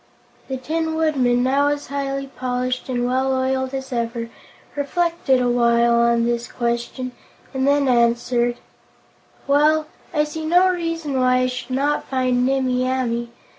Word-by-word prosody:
The 265 - -3
Tin 320 +4 -2
Woodman, 260 -6 +2
now 275 +3 +2
as 290 0 -1
highly 275 -1 -3
polished 255 -1 -3
and 245 -1 -1
well 260 +2 +1
oiled 260 0 -1
as 265 -1 -5
ever, 230 -1 -3 0.4
reflected 300 -2 +1
a 250 - +1
while 235 -1 +3
on 235 0 +3
this 235 0 -2
question 240 +2 -3 0.4
and 265 0 0
then 285 -1 +3
answered: 240 0 +2 0.9
"Well, 305 +2 +3 0.3
I 300 - +2
see 300 +1 -5
no 355 +4 +4
reason 330 -6 -2
why 255 0 +3
I - - +2
should 250 0 -4
not 290 +2 0
find 255 -1 +1
Nimmie 260 -2 +1
Amee. 240 -2 -1
260 Hz, 145 wpm, -21 LUFS, 245-285 Hz, 0.9 s, no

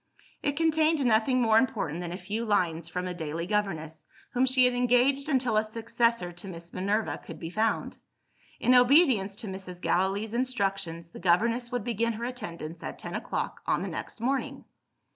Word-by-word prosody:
It 285 0 -1
contained 315 -2 +3
nothing 240 +2 +3
more 220 -1 +5
important 200 - -1
than 175 -1 -5
a 180 - -4
few 215 +3 -3
lines 170 -6 0
from 180 +1 -3
a 180 - -3
daily 165 -1 -4
governess, 175 -6 -2 0.2
whom 255 +1 +2
she 255 0 +5
had 250 - +3
engaged 250 +4 +3
until 255 -6 +2
a 215 - +4
successor 230 -3 0
to 175 +3 -10
Miss 170 -2 -8
Minerva 200 +4 -1
could 165 - -9
be 165 0 -6
found. 220 +4 -1 0.6
In 250 - +4
obedience 250 - +5
to 225 +1 -7
Mrs. 190 -2 -7
Gallilee's 195 +5 0
instructions, 195 -9 -2
the - - -10
governess 235 +7 +2
would 245 -3 -2
begin 230 0 0
her 230 +2 -4
attendance 170 -10 -6
at - - -6
ten - - -7
o'clock - - -3
on - - +1
the - - -3
next - - -6
morning. 260 +4 -2
220 Hz, 180 wpm, -28 LUFS, 180-245 Hz, 0.6 s, more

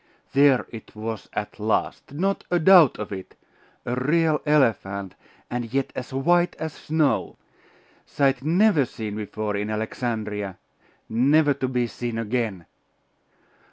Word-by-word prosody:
There 140 -2 +5
it 110 -2 -11
was 110 0 -5
at 105 +1 -5
last! 110 +4 -1
Not 190 +7 -1
a 175 - +2
doubt 170 -4 +6
of 105 - -6
it! 95 -2 -7 0.5
A 120 - -2
real 150 +4 +2
elephant, 100 -10 +1 0.3
and 120 -2 -4
yet 135 0 -1
as 130 - -6
white 175 +7 +2
as 160 -1 -5
snow. 155 -2 0 0.7
Sight 135 -3 +1
never 170 -1 +4
seen 110 -3 -6
before 105 0 -3
in 105 +1 -2
Alexandria 105 -3 -3 0.5
never 145 +6 +3
to 135 -1 -2
be 125 -1 0
seen 120 0 -5
again! 110 -5 -2
125 Hz, 130 wpm, -24 LUFS, 110-150 Hz, 0.7 s, doubt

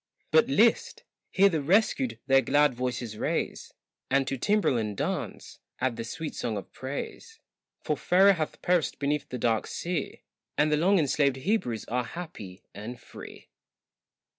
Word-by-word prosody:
But 470 - +5
list! 475 0 +2 0.3
hear 195 +1 +5
the 165 -6 0
rescued 220 - +2
their 135 0 +5
glad 145 +1 +3
voices 125 -3 -4
raise, - - -2 0.4
And 135 0 +2
to 135 - -1
timbrel 205 - +2
and 105 -3 -2
dance - - -4 0.2
add 125 -2 0
the 115 - -4
sweet 155 +7 -5
song 115 -3 -3
of 100 - -8
praise, 145 - -7 0.4
For - - 0
Pharaoh 195 +2 +5
hath 160 -4 -4
perished 175 -3 +1
beneath 145 +1 -1
the 125 - -4
dark 115 -2 0
sea, 170 -4 -4 0.3
And 150 +1 +3
the - - +4
long 190 +6 +4
enslaved 140 -3 +2
Hebrews 130 - -1
are 125 +2 -1
happy 115 - -9
and 115 +5 -7
free. - - -12
140 Hz, 155 wpm, -28 LUFS, 120-180 Hz, 0.4 s, But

